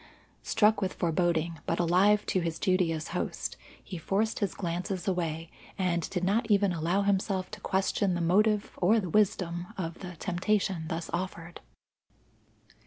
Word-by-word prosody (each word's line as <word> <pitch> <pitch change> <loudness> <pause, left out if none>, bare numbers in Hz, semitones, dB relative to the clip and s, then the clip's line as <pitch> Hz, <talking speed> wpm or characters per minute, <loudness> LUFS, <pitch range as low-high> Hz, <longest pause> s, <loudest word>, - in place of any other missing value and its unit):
Struck 215 -1 +3
with 190 -1 -1
foreboding, 170 -1 0
but 165 - 0
alive 190 +5 +4
to 185 - +1
his 165 -2 -2
duty 185 -3 +2
as 160 -1 -4
host, - - -3 0.3
he 180 - -7
forced 205 +7 0
his 200 -4 -1
glances 180 +1 -3
away, 165 -3 -2 0.3
and 175 -3 0
did 180 -2 -2
not 220 +5 +1
even 200 -2 +3
allow 175 +4 +1
himself 195 -1 0
to 215 -1 -8
question 190 -1 +1
the - - -1
motive 205 +5 +2
or 210 +6 +4
the 185 -5 -4
wisdom 180 -4 +1
of 165 -3 -4
the 180 -2 -7
temptation 185 0 0
thus 165 0 -4
offered. 175 -1 -4
185 Hz, 155 wpm, -29 LUFS, 170-200 Hz, 0.3 s, alive